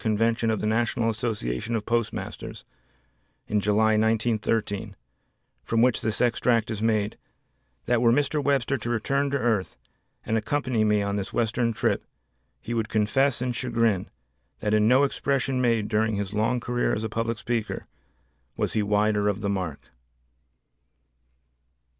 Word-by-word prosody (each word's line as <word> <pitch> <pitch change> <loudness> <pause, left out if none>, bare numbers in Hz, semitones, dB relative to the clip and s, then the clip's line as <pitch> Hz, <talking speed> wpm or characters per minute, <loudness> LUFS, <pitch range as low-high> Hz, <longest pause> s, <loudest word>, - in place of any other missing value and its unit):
Convention 115 +1 +1
of 110 - 0
the - - -2
National 115 +1 +1
Association 110 - -3
of 105 -2 -2
Postmasters, 115 -1 -3 0.8
in 105 - 0
July, 110 +2 +3
1913, 110 -2 0 0.7
from 115 - +1
which 125 -2 +3
this 110 0 -2
extract 120 -1 +2
is 110 -1 -4
made, 110 -2 0 0.7
"that 120 -1 +2
were 120 -1 +5
Mr. 145 +3 +1
Webster 135 -2 +1
to 115 - -4
return 140 +5 0
to 140 - 0
earth 110 -7 0 0.5
and 110 0 +1
accompany 125 -1 0
me 105 -1 +2
on 100 0 -1
this 100 - -4
western 115 0 +1
trip 110 0 0 0.6
he 120 - -5
would 115 -1 -1
confess 120 +5 +1
in 125 - -1
chagrin 115 -5 0 0.5
that 105 -1 -1
in 105 0 +4
no 130 +4 +5
expression 135 -2 0
made 115 -4 +2
during 110 0 +1
his 100 0 -3
long 110 +4 +1
career 120 +1 0
as 110 - -2
a - - -1
public 115 +1 -2
speaker 115 0 -3 0.7
was - - -1
he 110 - +1
wider 105 0 +2
of 105 +1 -2
the 100 - -1
mark." 90 -7 -4
110 Hz, 150 wpm, -26 LUFS, 105-120 Hz, 0.8 s, were